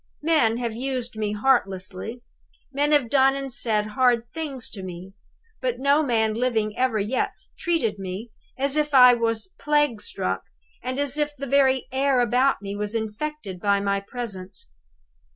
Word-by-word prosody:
Men 300 -9 +3
have 235 -2 -2
used 250 -1 -3
me 210 -1 -2
heartlessly; 210 -1 0 0.5
men 290 +2 +1
have 290 -5 +4
done 270 +2 +4
and 275 -2 -5
said 215 -3 0
hard 240 +1 +3
things 290 -6 -4
to 195 - -7
me; 185 +1 -8 0.5
but 250 -2 -1
no 280 +3 +3
man 225 -6 +1
living 220 -3 0
ever 255 -3 +1
yet 215 +5 -1 0.2
treated 325 - -1
me 195 +4 -6 0.3
as 275 +1 0
if 300 -2 +1
I 250 -1 +9
was 230 -4 -1
plague 295 -7 +1
struck, - - -2 0.4
and 255 +2 -3
as 285 +1 -1
if 295 0 -1
the 275 - -4
very 265 -1 +3
air 265 0 +2
about 245 0 +2
me 200 0 -4
was 210 +2 -2
infected 220 -2 -4
by 200 +1 +2
my 200 0 0
presence! 195 - -7
245 Hz, 160 wpm, -24 LUFS, 210-275 Hz, 0.5 s, I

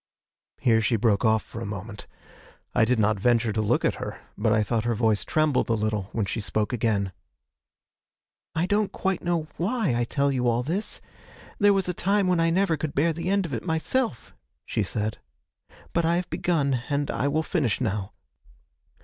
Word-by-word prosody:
Here 115 -2 +3
she 110 +2 +2
broke 110 -1 +2
off 110 -1 +3
for 115 - -8
a - - -3
moment. 100 +1 -7 0.7
I - - +4
did 125 +2 +2
not 110 -1 +2
venture 115 0 +2
to 110 - 0
look 105 - +1
at - - 0
her, - - -5 0.2
but 110 +1 +1
I 110 0 +3
thought 110 +1 0
her 120 0 0
voice 110 -2 +2
trembled 155 -6 +1
a - - +3
little 105 -2 -1
when 110 -3 -1
she 110 +3 -3
spoke 105 +3 -1
again. 105 -5 0 1.4
'I 165 +2 +2
don't 205 +1 +1
quite 190 -2 -1
know 170 -3 0
why 200 - 0
I 120 0 +1
tell 140 +3 +1
you 125 -2 0
all 120 +1 +2
this. 180 - -2 0.6
There 205 -2 +5
was 195 -2 +1
a 180 - -1
time 195 +3 +1
when 180 -2 +2
I 165 0 +3
never 170 -1 +2
could 145 0 -4
bear 160 +3 +2
the 170 +3 -3
end 200 -1 +2
of 155 - -6
it 115 - -3
myself,' 160 - -1 0.3
she - - -1
said; 105 0 -2 0.7
'but 170 - +2
I 165 +1 +2
have 180 +1 -2
begun, 140 -8 +1
and 145 0 0
I 140 - 0
will 155 +3 +1
finish 145 - 0
now. 105 -4 -2
125 Hz, 195 wpm, -26 LUFS, 110-170 Hz, 1.4 s, There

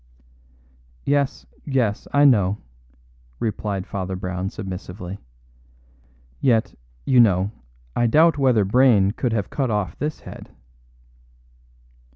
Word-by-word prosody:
"Yes, 140 - 0 0.2
yes; 125 -7 -1
I 145 0 +4
know," 105 -7 +4 0.8
replied 100 -3 -3
Father 95 -1 -4
Brown 90 0 -4
submissively. 95 -1 -7 1.2
"Yet, 115 -4 +2 0.3
you 130 - +4
know, 100 -3 +4 0.4
I 120 - +2
doubt 155 +5 +4
whether 125 -7 +3
Brayne 105 -3 +4
could 120 +2 -2
have 105 -4 -2
cut 135 -3 -1
off 105 -7 -1
this 150 +1 -3
head." - - -11
105 Hz, 105 wpm, -22 LUFS, 95-130 Hz, 1.2 s, I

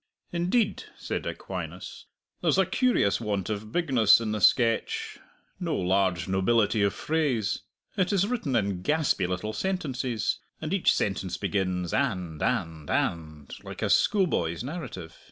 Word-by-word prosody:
"Indeed," 185 +6 0
said - - -4
Aquinas, - - -6 0.3
"there's - - +2
a - - +4
curious 245 - +2
want 105 -3 -2
of 105 +1 -5
bigness 130 - +5
in 110 -2 -2
the 105 -1 -2
sketch 115 +3 +2 0.4
no - - -1
large 95 -1 +1
nobility 105 +3 +2
of 100 -1 +2
phrase. 145 -10 0 0.4
It 185 -2 +2
is 195 -1 +3
written 205 - -2
in 100 -5 0
gaspy 150 - +1
little 95 +4 -3
sentences, 130 - -2 0.2
and 155 +3 -3
each 195 - +4
sentence 95 -2 -1
begins 90 -3 -1
'and' 90 - -1
'and' 80 -11 -1
'and,' 75 -4 -2
like - - -7
a - - +1
schoolboy's 140 - +2
narrative. 130 - -7
110 Hz, 135 wpm, -27 LUFS, 95-155 Hz, 0.4 s, bigness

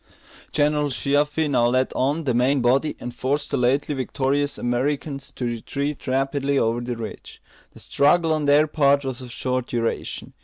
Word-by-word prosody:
General 150 0 +1
Sheaffe 145 +3 +1
now 120 -4 +3
led 130 +2 +1
on 145 +5 0
the 130 -4 0
main 130 +4 +2
body, 130 +5 +2
and 120 - -6
forced 135 +4 -2
the - - +1
lately 135 +4 +1
victorious 140 +2 -1
Americans 135 +3 -2
to 125 - -3
retreat 140 +5 -4
rapidly 135 +1 0
over 115 -1 +1
the 120 -1 -4
ridge. 110 -2 -8 0.3
The - - -14
struggle 160 +3 +2
on 155 -1 -1
their 145 +2 +5
part 140 -2 +2
was 130 -1 -3
of 125 -1 -9
short 125 0 -2
duration. 115 -1 -3
135 Hz, 165 wpm, -23 LUFS, 125-145 Hz, 0.3 s, their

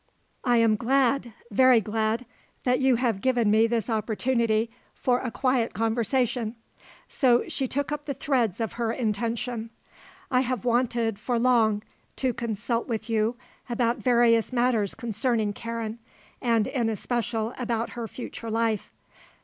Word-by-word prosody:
"I 245 -1 +3
am 225 -2 +4
glad, 260 +1 +2 0.2
very 255 +2 +6
glad, 220 +3 -1 0.4
that 250 0 +2
you 265 -2 +4
have 230 -5 0
given 240 -4 +2
me 220 +2 +5
this 230 -2 -1
opportunity 225 0 0 0.2
for 250 -1 +1
a 250 - -3
quiet 255 -1 0
conversation," 230 +1 0 0.5
so 245 -3 +2
she 265 - -2
took 285 +3 -2
up 295 0 -4
the 280 - -2
threads 240 -8 0
of 225 -2 -2
her 235 -1 -1
intention. 230 0 -2 0.6
"I 250 - +4
have 255 -4 -2
wanted, 235 -3 +1
for 240 +2 -1
long, 230 -4 +3 0.3
to 260 -2 0
consult 230 +1 -2
with 225 -1 -3
you 225 +2 +1 0.3
about 235 0 0
various 235 -2 +3
matters 240 -5 +1
concerning 225 -1 0
Karen, 230 0 -5 0.4
and, 230 -4 +2
in 255 -4 -1
especial, 230 +1 -2
about 235 -2 -1
her 235 -2 -5
future 230 -1 -7
life. 225 -2 0
235 Hz, 140 wpm, -26 LUFS, 225-250 Hz, 0.6 s, very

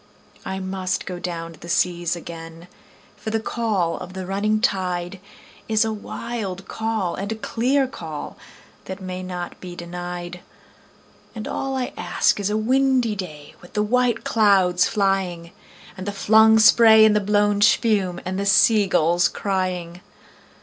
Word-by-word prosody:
I 190 - -4
must 190 0 -3
down 175 -2 -5
go - - -13
to - - -18
the 170 - -10
seas 175 -1 0
again, 165 0 -10 0.5
for 210 +1 -6
the 225 0 0
call 215 -7 -1
of 180 0 -9
the 190 -1 -6
running 205 +3 0
tide 185 -5 -1 0.5
Is 220 0 +3
a 220 - -2
wild 205 -3 -6
call 220 -5 -2
and 200 +2 -5
a - - -2
clear 255 +5 0
call 160 - -7 0.5
that 190 +1 -7
may 185 -1 -6
not 180 -1 -6
be 180 -1 -8
denied; 175 0 -6 1.0
And 215 - -6
all 270 0 -3
I 255 - -3
ask - - +1
is 200 0 -1
a 210 - 0
windy 255 0 +2
day 155 -7 -8
with 175 - -16
the 210 - +1
white 240 +1 +1
clouds 190 -5 +3
flying, 190 -5 -1 0.4
And 190 +1 -8
the - - -1
flung 220 +2 +5
spray 220 0 +7
and 215 -1 +4
the - - +4
blown 205 0 +1
spume, 200 -4 +2
and 185 +1 -3
the 200 - -2
sea 200 +1 +5
gulls 175 0 +3
crying. 185 -3 -3
195 Hz, 155 wpm, -22 LUFS, 180-220 Hz, 1.0 s, spray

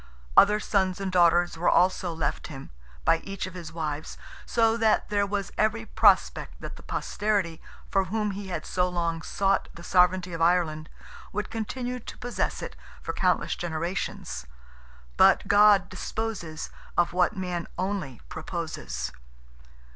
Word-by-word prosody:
Other 210 +1 +7
sons 190 -3 0
and 195 -1 -2
daughters 175 -1 +4
were 175 - +3
also 185 0 +3
left 160 -3 -2
him, 135 -3 -9 0.3
by 165 - +5
each 195 -1 -5
of 185 - -8
his 170 -3 -7
wives, 155 -2 -4 0.3
so 225 -1 +3
that 225 -2 +2
there 200 -1 +2
was 200 0 -2
every 220 +1 +1
prospect - - +3
that - - -7
the - - -12
posterity 200 -6 -1 0.3
for 195 -1 +2
whom 210 +2 -1
he 200 0 -6
had 170 -4 -4
so 180 0 +1
long 170 -2 -1
sought 195 +3 +1
the 170 - -11
sovereignty 180 0 +3
of 165 - -4
Ireland, 165 -2 +2 0.4
would 210 +1 -3
continue 245 +3 -3
to - - -10
possess 245 +1 -2
it - - -6 0.3
for - - -3
countless - - +1
generations. 160 - -4 0.7
But - - +5
God 205 -2 +6
disposes 185 -4 -4 0.3
of 175 0 +3
what 180 +3 +2
man 180 -2 -3
only 185 - -3
proposes! 160 - -5
180 Hz, 145 wpm, -27 LUFS, 165-205 Hz, 0.7 s, Other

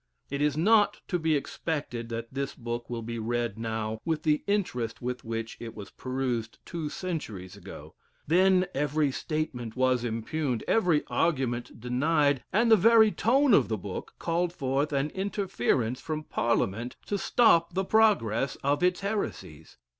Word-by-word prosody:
It 140 0 -2
is 150 -1 +1
not 210 +5 +4
to 180 - 0
be 160 -1 +2
expected 140 -5 -3
that 115 +1 -5
this 140 0 -3
book 120 -1 -5
will 115 -1 -4
be 115 +1 -4
read 115 -1 -2
now 110 -1 -3
with 160 -2 -1
the 150 -1 +2
interest 125 - -1
with 125 0 -4
which 115 0 -4
it 115 -1 -8
was 100 -2 -9
perused 130 -3 -3
two 165 -3 -4
centuries 115 - -5
ago; - - -11 0.3
then 185 +3 +4
every 145 +1 +1
statement 130 -7 -3
was 130 -1 +2
impugned, 120 +2 -2
every 175 -9 +3
argument 125 -8 -1
denied, 140 +3 +1
and 230 +4 +3
the - - +10
very 220 +1 +6
tone 260 +4 +3
of - - +5
the 110 - -1
book 95 -1 -7
called 170 +1 0
forth 140 -2 -1
an 140 +1 0
interference 180 - -1
from 155 -1 -4
parliament 115 -2 -1
to 205 - -2
stop 170 -9 +3
the 190 0 0
progress 140 - +3
of 145 +3 +1
its 180 +1 +2
heresies. 100 - -4
140 Hz, 155 wpm, -28 LUFS, 115-175 Hz, 0.3 s, the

